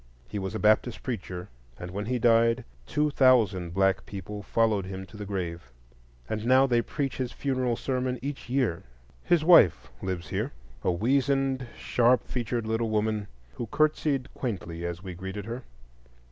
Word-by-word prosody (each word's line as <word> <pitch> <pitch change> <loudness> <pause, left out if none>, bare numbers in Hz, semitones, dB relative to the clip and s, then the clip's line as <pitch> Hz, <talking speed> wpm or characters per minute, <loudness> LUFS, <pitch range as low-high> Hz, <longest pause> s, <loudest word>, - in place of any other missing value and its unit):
He 105 - -4
was 95 +2 -4
a - - -2
Baptist 110 +2 +2
preacher, 90 -7 -4 0.3
and 90 0 -7
when 100 +3 -4
he 125 +1 0
died, 115 0 +4 0.2
two 150 0 +1
thousand 110 -11 +4
black 95 -2 +2
people 100 +1 -6
followed 110 -2 +1
him 95 0 -6
to 105 - -16
the 105 -1 -6
grave; 85 -8 -4 0.6
and 110 0 -3
now 130 +3 +5
they 120 -3 +3
preach 135 +3 -3
his 130 -2 -2
funeral 130 -3 -1
sermon 130 0 -1
each 140 -1 -6
year. 125 -10 +1 0.4
His 165 -3 +2
widow 160 - +8 0.3
lives 90 -2 -4
here,—a 60 +6 -3
weazened, 135 +5 +1
sharp 125 +1 +3
featured 120 -2 -2
little 110 +1 0
woman, 110 -1 0 0.3
who 120 - -3
curtsied 150 0 +1
quaintly 85 -8 -4
as 85 +1 -6
we 95 -2 -6
greeted 95 +3 -6
her. 120 +3 -5
115 Hz, 160 wpm, -28 LUFS, 95-130 Hz, 0.6 s, widow